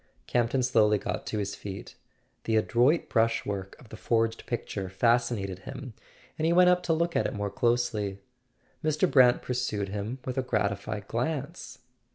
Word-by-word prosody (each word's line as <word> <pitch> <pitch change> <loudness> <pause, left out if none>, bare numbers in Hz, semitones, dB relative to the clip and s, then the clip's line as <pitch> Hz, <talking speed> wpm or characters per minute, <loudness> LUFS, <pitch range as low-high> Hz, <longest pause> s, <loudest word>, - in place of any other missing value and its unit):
Campton 120 +2 +1
slowly 110 -4 +4
got - - -4
to - - -2
his 100 -1 -2
feet. 100 -1 -8 0.5
The 110 - +1
adroit 120 +8 +3
brush 115 -1 +1
work 100 -1 -4
of 120 - -17
the - - -9
forged 115 +1 0
picture 100 -5 -4
fascinated 115 -2 +1
him, 130 +5 -8 0.5
and 160 - +2
he 170 - +3
went 180 +1 +6
up 180 0 +2
to 165 - +2
look 170 +1 0
at - - +2
it - - -5
more 105 -1 -2
closely. 115 -5 0 0.7
Mr. 155 +3 +2
Brant 125 -6 +5
pursued 120 -6 -2
him 105 +5 -4
with 130 0 -2
a - - +2
gratified 105 -3 -2
glance. 140 +7 -3
115 Hz, 170 wpm, -28 LUFS, 105-130 Hz, 0.7 s, went